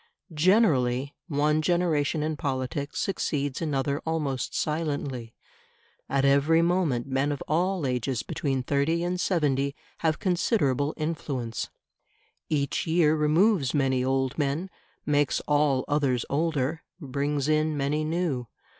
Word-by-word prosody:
Generally 150 - +3
one 150 0 +2
generation 160 -3 +1
in 155 0 -1
politics 135 0 -3
succeeds 145 -7 -1
another 140 -2 -1
almost 150 -6 -2
silently; 145 -7 -2 0.7
at 140 0 +2
every 145 +4 +4
moment 170 -9 +1
men 135 +1 0
of 145 - -4
all 180 +1 +1
ages 125 -1 -1
between 135 -3 -2
thirty 145 +6 +1
and 180 +1 -1
seventy 140 -6 +1 0.2
have 160 -2 +1
considerable 170 - +1
influence; 140 -7 -3 0.8
each 145 +1 -1
year 160 -2 +3
removes 155 - +3
many 130 -3 +2
old 135 +2 0
men, 150 +6 -1 0.3
makes 145 -1 +2
all 145 -3 +2
others 140 -5 +1
older, 155 0 0 0.2
brings 145 -1 -2
in 155 0 +1
many 145 +2 0
new. 155 -6 -1
145 Hz, 120 wpm, -27 LUFS, 135-160 Hz, 0.8 s, every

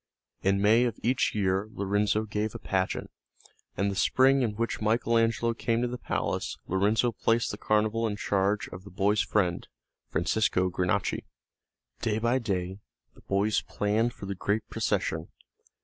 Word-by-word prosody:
In 100 +1 +2
May 115 +4 +5
of 120 - -2
each 125 0 +1
year 95 0 +1
Lorenzo 105 +1 +1
gave 105 0 -3
a - - -2
pageant, 95 -1 -2 0.7
and 100 +1 +1
the - - -4
spring 135 +6 +4
in 110 -4 0
which 115 +1 -2
Michael 115 +2 +1
Angelo 115 0 +2
came 115 +1 0
to - - +1
the 125 0 -5
palace - - -2
Lorenzo 105 +6 +2
placed 115 +1 +1
the 105 - -6
carnival 110 +1 +1
in 105 - -2
charge 100 0 0
of 90 0 -9
the 100 - -11
boy's 100 +2 +2
friend, 90 -5 0 0.4
Francesco 90 +1 +1
Granacci. 90 +2 0 0.8
Day 110 -2 0
by 120 +3 +2
day 95 -4 -3 0.3
the - - -19
boys 100 +2 +1
planned 110 +3 0
for - - -9
the 100 - -3
great 100 +3 -1
procession. 80 +1 -1
105 Hz, 160 wpm, -28 LUFS, 100-115 Hz, 0.8 s, May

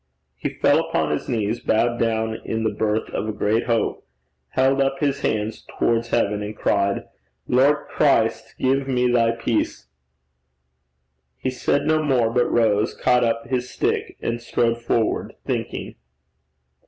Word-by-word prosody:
He - - -3
fell - - +3
upon - - 0
his - - -3
knees, 110 0 -1
bowed 120 +2 +1
down 110 -1 0
in 110 0 -2
the 110 - 0
birth 110 0 -1
of 110 - -2
a - - 0
great 105 +2 0
hope, 115 -3 0 0.5
held 135 - +2
up 135 0 +1
his 140 -1 0
hands 110 0 -2
towards 115 0 +1
heaven, 105 -3 +1
and 105 0 -6
cried, 100 -1 +1 0.4
'Lord 140 +4 +3
Christ, - - +1
give 135 +1 +1
me 125 -2 +2
thy 115 -2 +3
peace.' 115 - -1 1.5
He 130 - -2
said 140 +2 0
no 155 0 +2
more, 125 -6 +2
but 120 +1 +2
rose, 110 -2 +2
caught 125 0 +3
up 115 0 0
his 125 -1 -2
stick, - - -2
and 120 0 -2
strode 115 0 0
forward, 115 -1 0
thinking. - - -3
115 Hz, 150 wpm, -22 LUFS, 110-125 Hz, 1.5 s, fell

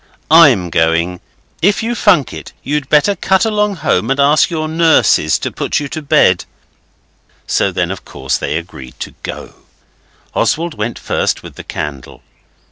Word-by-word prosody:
I'M 130 - +6
going. 85 +3 +1 0.4
If 200 +5 +2
you 235 +2 -1
funk 170 - +2
it - - -9
you'd 145 -1 -2
better 155 +7 +3
cut 190 +2 +1
along 210 -2 0
home 115 -5 +1
and 135 +1 0
ask 145 +2 +4
your 155 -2 -2
nurses 160 - +3
to - - -4
put - - -2
you 145 - -4
to 155 - -5
bed.' 95 -10 +3 1.0
So 100 - 0
then, 90 -1 -1
of 95 - -7
course, 65 0 -3
they 75 - -2
agreed 70 -8 -10
to - - -6
go. - - -7 0.8
Oswald 170 +1 0
went 110 +2 -4
first - - -2
with - - -10
the - - -10
candle. 75 -3 -7
140 Hz, 160 wpm, -15 LUFS, -, 1.0 s, I'M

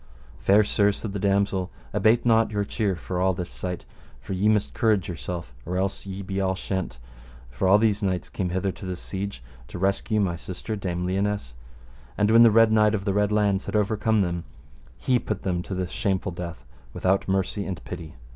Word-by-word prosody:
Fair 105 +2 +5
sir, 105 0 +3
said 100 0 -5
the 100 - -2
damosel, 100 -1 +1 0.2
abate 115 +2 +3
not 115 -1 +4
your 105 -1 -1
cheer 100 -2 -1
for 90 +2 -4
all 95 0 +2
this 90 -1 -5
sight, 90 -1 -5 0.3
for - - -6
ye 100 +3 +2
must 105 -2 +1
courage 105 -5 +2
yourself, 85 -5 -5
or 90 +5 -3
else 95 +1 -2
ye 95 0 -5
be 95 +1 -2
all 95 0 +1
shent, 95 -8 -3 0.5
for 60 +9 0
all 100 +2 +7
these 105 -1 +2
knights 95 -3 -1
came 95 -3 -3
hither 95 +2 0
to 95 - -9
this 90 -1 -4
siege 95 -9 -5 0.2
to - - -7
rescue 100 +3 +1
my 95 -4 +1
sister 90 +5 -5
Dame 90 -3 -3
Lionesse, 95 -7 -1 0.6
and 105 +1 +3
when 115 +1 +7
the 115 - +9
Red 115 0 +5
Knight 105 0 +4
of 100 -2 -4
the 100 - +1
Red 105 0 +2
Launds 105 -2 +2
had - - -3
overcome 105 +1 +2
them, 85 -1 -2 0.5
he 125 - +2
put 105 -4 -4
them 90 -2 0
to 95 - -5
this 90 -1 -3
shameful 95 -1 -1
death 85 -4 -7 0.3
without 95 +1 +1
mercy 95 +1 0
and 95 -3 -5
pity. 85 -3 -8
95 Hz, 205 wpm, -25 LUFS, 90-105 Hz, 0.6 s, the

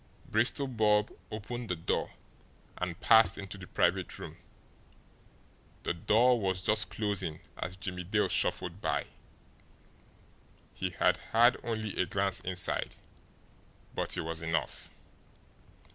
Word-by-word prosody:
Bristol 120 +5 +2
Bob 105 -4 +2 0.2
opened 115 +3 -5
the 90 - +1
door 80 - -1 0.6
and 90 -2 -4
passed 115 0 +6
into 100 0 -6
the 95 -2 -10
private 90 +1 +1
room - - -8 1.5
the - - 0
door 115 +8 +4
was 95 -1 0
just 110 +1 +2
closing 100 -7 -2 0.2
as 90 - -5
Jimmie 90 -1 -4
Dale 105 +3 +1
shuffled 90 - 0
by. - - 0 1.7
He - - -2
had - - +2 0.2
had 120 +3 +6
only 110 -3 -3
a 90 - 0
glance 95 0 0
inside 90 -2 -2 1.0
but - - -2
it - - 0
was 80 0 -3
enough. 80 0 -2
100 Hz, 120 wpm, -31 LUFS, 90-110 Hz, 1.7 s, passed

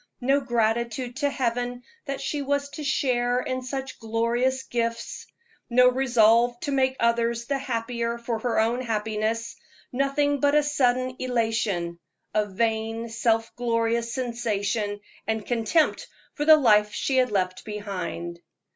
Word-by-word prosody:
No 270 +3 +3
gratitude 235 0 -1
to 285 0 +1
Heaven 245 -2 -2 0.2
that 275 0 -3
she 295 - -2
was 285 0 -1
to 300 - -7
share 250 -3 +1
in 255 0 -3
such 265 +1 -5
glorious 235 +3 0
gifts; 230 -1 -3 0.4
no 250 +1 +6
resolve 240 -2 +3
to 285 - -2
make 260 -1 +2
others 235 0 +1
the 275 +2 -1
happier 235 -2 -2
for 235 -1 -3
her 235 +1 +1
happiness; 220 0 -2 0.4
nothing 280 +2 +1
but 285 +2 +3
a 300 - +5
sudden 255 -3 +1
elation, 225 -8 -1 0.3
a 210 -1 +1
vain, 225 +2 -1
self 225 0 0
glorious 230 -1 0
sensation, 215 -4 -2 0.3
and 220 -1 -1
contempt 240 +7 +1 0.3
for 295 - -2
the 315 0 +9
life 210 -6 +4
she 265 - 0
had 255 -1 +4
left 185 -3 -1
behind. 185 -5 -5
235 Hz, 135 wpm, -25 LUFS, 225-260 Hz, 0.4 s, the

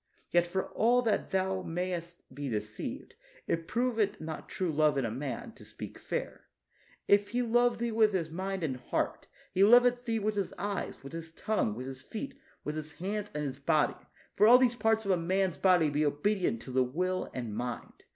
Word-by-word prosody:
Yet 175 0 +4
for 190 +2 -1
all 245 +2 +3
that 220 -3 0
thou 190 0 0
mayest 175 0 -4
be 140 0 -4
deceived. 105 -1 -5 0.3
It 165 0 -1
proveth 230 -4 0
not 160 0 -6
true 185 -3 -1
love 150 -1 +3
in 135 - +1
a 115 - -2
man, 130 0 -4
to - - -16
speak - - -9
fair. - - -4 0.6
If 200 0 +5
he 245 +4 0
love 240 0 +3
thee 235 +1 -1
with 220 -1 +4
his 165 -4 -1
mind 190 +2 -3
and 135 -5 -1
heart, 125 - -2 0.3
he 190 - +4
loveth 245 +3 +6
thee 230 -2 0
with 215 0 0
his 200 -2 -2
eyes, 200 -7 -3
with 140 - -9
his 165 0 -6
tongue, 205 - 0
with 125 +3 -6
his 130 0 -7
feet, 230 - -6 0.3
with 150 +1 -3
his 155 0 -6
hands 205 +3 -3
and 150 - -1
his 135 -3 -4
body: - - +1 0.3
for 210 - +6
all 245 +2 +10
these 250 -2 +3
parts 220 -1 +2
of 195 - +2
a 185 - +4
man's 185 -1 0
body 180 -1 +4
be 150 +1 +1
obedient 150 - 0
to 130 - -8
the 130 0 +3
will 180 +8 -1
and 120 -5 -4
mind. 120 +1 -5
185 Hz, 200 wpm, -31 LUFS, 150-215 Hz, 0.6 s, all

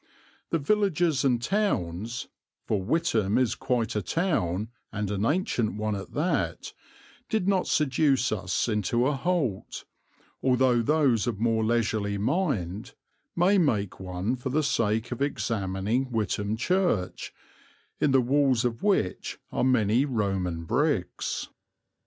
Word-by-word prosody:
The 165 - +1
villages 175 -3 +1
and 125 -4 +2
towns 120 - -1 0.4
for 105 -3 0
Witham 110 - +1
is 130 -3 +2
quite 120 -4 -1
a 105 - +1
town, 105 - -1 0.2
and 105 -1 -3
an 105 +2 0
ancient 140 - 0
one 105 0 -1
at 95 - -7
that 160 +5 -1 0.6
did 215 -4 0
not 195 -2 +2
seduce 140 -2 +2
us 95 -1 -1
into 115 +2 +1
a 145 - +2
halt, 140 - -2 0.6
although 125 -2 +3
those 130 -4 +2
of 110 -4 -2
more 115 -1 +1
leisurely 110 -3 0
mind 110 - -1 0.4
may 190 +3 +4
make 105 - 0
one 95 +5 -2
for 130 +1 -5
the 155 +4 +1
sake 115 -3 0
of 125 - -4
examining 110 -2 -1
Witham 105 -2 -1
Church, 150 - 0 0.7
in 150 - +3
the 135 -1 +4
walls 130 -1 +2
of 115 -1 -2
which 195 - 0
are - - -1
many 125 0 +3
Roman 95 - -1
bricks. 80 - -1
120 Hz, 130 wpm, -27 LUFS, 105-145 Hz, 0.7 s, may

